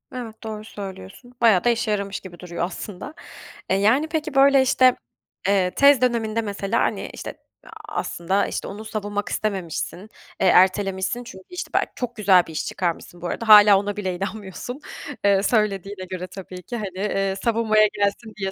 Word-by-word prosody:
Evet, 225 -3 -7
doğru 215 -1 -6
söylüyorsun. 200 - -10
Bayağı 220 -6 +5
da 240 - +3
işe 225 -2 0
yaramış 200 -1 -2
gibi 175 -2 -12
duruyor 175 -2 -5
aslında. 190 - -7 0.6
Eee, 190 - +3
yani, 230 +10 +3
peki, 315 -2 -3
böyle, 275 0 +6
işte, 255 -1 +4 0.5
eee, 190 -2 +2
tez 280 +1 +5
döneminde 230 -3 +1
mesela, 200 0 -2
hani, - - -1
işte, - - -7 0.3
aaa, - - -15 0.3
aslında, 190 +4 -1
işte, - - -4
onu 210 +2 -8
savunmak 205 -1 -3
istememişsin, 190 -8 -3 0.4
eee, 190 - +4
ertelemişsin 190 +5 +3
çünkü, 190 -5 -11
işte, 360 - -6
belki - - +1
çok 245 -2 -4
güzel 195 -5 +4
bir - - -9
iş 155 - -3
çıkarmışsın 175 -1 -4
bu 175 - -3
arada, 230 +5 -4
hâlâ 210 -2 +9
ona 205 0 -4
bile 190 -3 -2
inanmıyorsun. 205 +6 -6 0.5
Eee, 200 -1 +4
söylediğine 200 -4 0
göre 185 -1 -5
tabii 185 -1 -10
ki, 240 - -6
hani, 195 -4 -6
eee, 195 -1 -1
savunmaya 220 -2 +3
gelsin 205 +2 -1
diye 195 -1 -2
205 Hz, 170 wpm, -23 LUFS, 190-230 Hz, 0.6 s, hâlâ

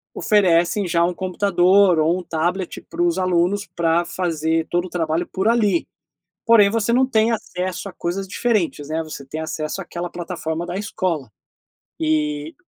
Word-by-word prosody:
oferecem 185 -1 +2
já 170 0 +2
um 180 - -1
computador 185 0 +3
ou 165 +4 +2
um - - -8
tablet 175 +3 -2
para - - -4
os 175 +1 +1
alunos, 185 +2 +1
pra 170 0 +2
fazer 165 -2 -1
todo 175 +1 0
o - - -13
trabalho 165 0 -1
por 190 +2 -1
ali, 210 -7 +2 0.6
porém 225 -3 +6
você 230 +1 0
não 260 +2 +4
tem 225 -3 +2
acesso 185 -3 -4
a - - -10
coisas 185 +2 -3
diferentes, 200 - -1
né, 160 +1 -1
você 155 -3 -8
tem 155 +4 -5
acesso 155 +2 -4
àquela 175 -1 -6
plataforma 170 -1 -4
da 175 +1 -4
escola 185 - -2 0.7
e 150 -1 -1
175 Hz, 160 wpm, -21 LUFS, 165-195 Hz, 0.7 s, porém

